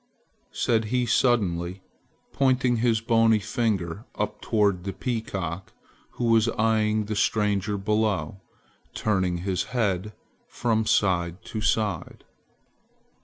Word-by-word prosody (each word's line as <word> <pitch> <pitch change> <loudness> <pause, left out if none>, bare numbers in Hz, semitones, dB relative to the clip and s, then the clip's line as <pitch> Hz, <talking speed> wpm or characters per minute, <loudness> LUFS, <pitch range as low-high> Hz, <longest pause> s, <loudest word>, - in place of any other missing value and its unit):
said 115 -2 +1
he 125 +3 0
suddenly, 95 -7 +1 0.5
pointing 130 -2 +2
his 115 -1 +2
bony 115 -1 +4
finger 105 -3 -2
up - - -3
toward 100 -5 +1
the 95 0 -4
peacock, 95 -5 -4 0.4
who - - -5
was 115 -1 +4
eyeing 110 -1 +2
the 110 +1 -3
stranger 105 -1 +1
below, 105 -1 -1 0.5
turning 95 -4 0
his 95 -2 -1
head 105 -2 0 0.3
from 110 -2 0
side 90 -2 +1
to 110 - -5
side. 105 -5 -1
105 Hz, 110 wpm, -25 LUFS, 95-115 Hz, 0.5 s, bony